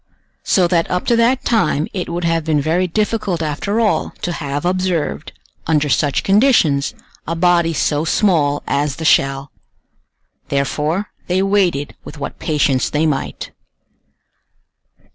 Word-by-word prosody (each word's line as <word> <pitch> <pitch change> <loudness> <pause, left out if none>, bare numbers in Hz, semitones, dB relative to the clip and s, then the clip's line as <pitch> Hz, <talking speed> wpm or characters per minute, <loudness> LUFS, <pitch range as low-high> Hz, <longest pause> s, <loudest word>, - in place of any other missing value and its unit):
So 185 -3 +3
that 170 -1 +1
up 180 0 -1
to 235 - +3
that 245 +3 +2
time 155 -9 +1
it 185 -3 -4
would 175 +1 -3
have 165 -1 +1
been 155 -1 +1
very 165 +5 +1
difficult 205 -2 -1
after 180 +8 -2
all 220 -3 0
to 175 - -1
have 145 -2 -4
observed, 180 -4 -1 0.4
under 150 -2 +1
such 145 0 +1
conditions, 195 - +3 0.3
a 165 - -2
body 170 -1 +3
so 150 -1 0
small 160 -5 +1
as 145 -1 -1
the 160 - -6
shell. 135 -2 +2 1.0
Therefore 150 +8 -1 0.2
they 185 +2 +1
waited 190 -8 +1
with - - -10
what 145 - -6
patience 145 -4 +1
they 150 +2 0
might. 150 -3 -3
165 Hz, 140 wpm, -18 LUFS, 145-185 Hz, 1.0 s, So